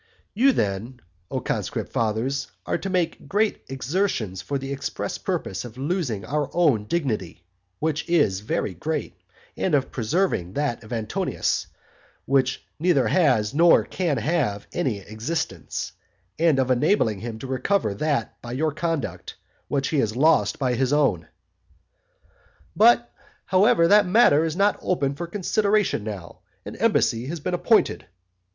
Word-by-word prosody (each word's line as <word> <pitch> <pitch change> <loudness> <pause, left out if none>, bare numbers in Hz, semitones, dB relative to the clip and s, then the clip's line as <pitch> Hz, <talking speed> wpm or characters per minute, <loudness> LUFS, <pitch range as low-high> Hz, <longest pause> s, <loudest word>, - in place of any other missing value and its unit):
You 260 +6 +4
then, 110 - -2 0.3
O - - -2
conscript - - -3
fathers, 115 +5 -1 0.2
are - - -1
to 195 - -4
make 180 -3 -1
great 210 +1 +1
exertions 130 - -1
for 140 +9 -3
the 135 +1 -4
express 140 - -4
purpose 95 - -3
of 120 -1 -10
losing 135 - -2
your 145 +4 -2
own 145 -12 +3
dignity, 105 - -2 0.3
which 150 - -2
is 145 - +3
very 105 -1 -2
great, 150 - -3 0.4
and 180 -5 +1
of 135 -2 0
preserving 115 - -1
that 140 -4 -2
of 110 - -14
Antonius, 110 -3 -1 0.6
which 130 -1 +1
neither 160 -5 +3
has 130 - +2
nor 170 +3 +5
can 170 -7 -1
have 120 -6 -1
any 130 -12 -1
existence, 110 - -4 0.5
and 165 -4 +4
of 130 -1 +1
enabling 125 - +2
him 115 0 -6
to 120 - -8
recover 130 - 0
that 140 +1 -2
by 120 0 -7
your 155 +4 0
conduct, 165 -2 -3 0.3
which 140 -1 -1
he 155 - +1
has 110 -3 0
lost 155 +5 +3
by 130 -3 0
his 130 +2 0
own. 140 - +2 1.5
"But, 235 +2 +4 0.3
however, 190 -2 +4
that 205 -1 +6
matter 180 -7 +5
is 160 -1 -2
not 200 +2 +2
open 140 -6 0
for 170 +4 -5
consideration 205 - +1
now, 100 -5 -7 0.3
an - - -7
embassy 115 +2 +1
has 165 +3 -4
been 180 +5 -3
appointed." 220 +5 +2
140 Hz, 145 wpm, -24 LUFS, 115-170 Hz, 1.5 s, that